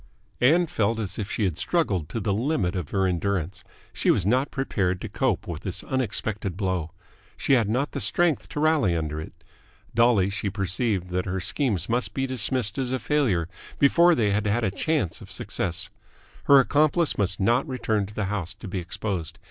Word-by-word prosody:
Ann 165 +8 +4
felt 115 -7 0
as 105 -2 -4
if 100 -2 -3
she 110 - -1
had 90 -5 -1
struggled 100 - 0
to 115 - -3
the 100 -1 0
limit 110 - 0
of 90 -5 -3
her 95 -1 +1
endurance. 90 -1 -1 0.3
She - - 0
was 90 - +3
not 130 +6 +2
prepared 95 -9 -1
to - - -5
cope - - 0
with - - -6
this - - -3
unexpected 110 -7 -1
blow. 95 -5 -1 0.5
She - - +1
had 115 -5 +3
not 130 +6 0
the - - -4
strength 175 -3 +2
to - - -4
rally 150 - +3
under 80 -1 -3
it. - - -12 0.5
Dully 115 -5 +4
she 105 0 -2
perceived 100 0 -1
that 90 0 -1
her 95 +1 -2
schemes 100 - 0
must 120 +2 -1
be 135 - 0
dismissed 130 -1 0
as 130 -2 -1
a 130 - +1
failure 120 - +1 0.3
before 170 +5 +5
they 105 -7 +2
had 105 +1 0
had 110 +4 +1
a 100 - +1
chance 135 - -1
of - - -11
success. 90 0 -3 0.6
Her 140 -1 +8
accomplice 150 - +2
must 95 -2 0
not 120 +9 +2
return 110 -6 -1
to 105 - -12
the 105 - -1
house 95 -3 -3
to 110 - -9
be 95 0 -3
exposed. 95 -2 -4
105 Hz, 195 wpm, -25 LUFS, 95-130 Hz, 0.6 s, Her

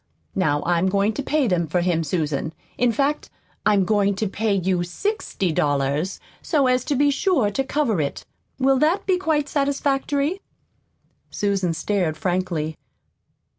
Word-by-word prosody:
Now 145 -1 +1
I'm 175 +2 +2
going 200 +3 +1
to 280 - -3
pay 295 +1 +1
them 175 -4 +1
for 175 +3 0
him, 170 -2 +1
Susan. 155 -1 -2 0.2
In 245 -1 +2
fact, 285 +5 0 0.4
I'm 200 -3 +4
going 200 0 +2
to 215 +2 -1
pay 210 +1 0
you 185 -1 +1
sixty 190 - -2
dollars, 145 +4 0 0.2
so 295 -6 +1
as 255 -1 +2
to 290 - 0
be 285 +2 +3
sure 285 - +1
to 270 - 0
cover 260 - 0
it. 140 - -4 0.3
Will 270 0 +3
that 335 +7 +2
be 375 -2 +2
quite 310 -5 +1
satisfactory?" 285 +3 0 0.9
Susan 195 -4 0
stared 175 -3 -1
frankly. 175 -3 -2
205 Hz, 150 wpm, -23 LUFS, 175-280 Hz, 0.9 s, I'm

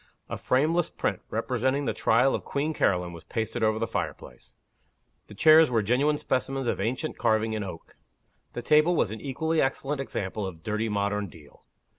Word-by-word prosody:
A - - -3
frameless 155 +6 +1
print, 100 -3 -2
representing 130 +5 -1
the - - 0
Trial 120 +4 +3
of - - -2
Queen 150 +3 -2
Caroline, 90 - +1
was 85 -1 -11
pasted 115 +6 -3
over 110 0 +2
the 115 - 0
fireplace. 110 - -6 0.7
The 105 - -12
chairs 155 +6 +7
were 115 -3 +1
genuine 135 +8 +2
specimens 135 -1 -2
of - - -1
ancient 125 +9 -2
carving 110 0 +1
in 110 -1 -2
oak. 90 -4 -9 0.6
The 120 - -5
table 155 +3 +4
was 105 - +1
an 110 - -7
equally 160 +4 0
excellent 135 +1 -1
example 105 -5 -4
of 80 -3 -10
dirty 110 +1 -1
modern 100 0 -1
deal. 80 -5 -17
115 Hz, 175 wpm, -27 LUFS, 105-140 Hz, 0.7 s, chairs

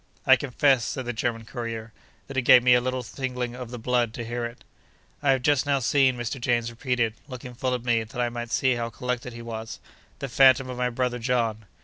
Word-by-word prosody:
I 130 - +8
confess 135 -1 +2
(said 130 +3 -4
the 120 - -3
German 115 0 -2
courier) 115 -2 -6 0.3
that 135 - -9
it 135 - +2
gave 125 0 +7
me 125 0 +6
a 125 - +5
little 130 0 -2
tingling 125 +1 -4
of 125 -2 -7
the 125 - -6
blood 120 -1 0
to 115 - -5
hear 120 +1 -3
it. 120 +1 -9 0.6
'I 145 - +1
have 130 - -1
just 145 0 +2
now 140 -1 +3
seen,' 130 0 +3
Mr. 120 +2 -4
James 120 -1 0
repeated, 120 -2 -1
looking 125 -2 -8
full 125 +1 -1
at 125 - -6
me, 115 -2 +2
that 110 +2 -9
I 120 -1 +1
might 120 0 -5
see 130 +2 +2
how 120 -1 -2
collected 125 +2 -4
he 115 0 -9
was, 110 -1 -6 0.4
'the 140 - -4
phantom 130 0 +5
of 125 - -7
my 125 0 +1
brother 125 0 -1
John. 115 -3 -1
125 Hz, 230 wpm, -26 LUFS, 115-130 Hz, 0.6 s, I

